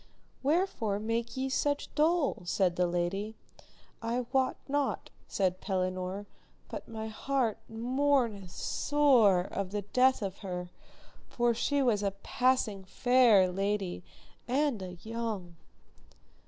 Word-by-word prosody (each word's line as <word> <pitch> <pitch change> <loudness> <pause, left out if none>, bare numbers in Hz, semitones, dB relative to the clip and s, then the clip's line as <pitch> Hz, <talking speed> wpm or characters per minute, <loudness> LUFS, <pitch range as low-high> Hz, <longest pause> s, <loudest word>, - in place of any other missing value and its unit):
Wherefore 275 - +1
make 230 +3 -2
ye 265 +1 0
such 285 +2 -1
dole? 315 - +2
said 180 0 +1
the 180 0 +2
lady. 185 +5 -2 0.7
I 235 +2 -1
wot 265 -1 +2
not, 285 0 -1 0.2
said 185 -2 0
Pellinore, 185 +1 -2 0.4
but - - -7
my 220 -1 -5
heart 235 0 -1
mourneth 240 -4 0
sore 245 -5 +3
of 195 +1 -4
the 205 +1 -3
death 255 +4 +3
of 195 -1 -4
her, 180 -2 -5 0.6
for 240 -1 +2
she 285 +4 +1
was 225 -5 +2
a 200 - +1
passing 250 -6 +1
fair 225 -2 +4
lady 195 -1 -2 0.4
and 265 -3 +1
a 185 -1 -6
young. 220 -6 -4
220 Hz, 120 wpm, -30 LUFS, 190-260 Hz, 0.7 s, fair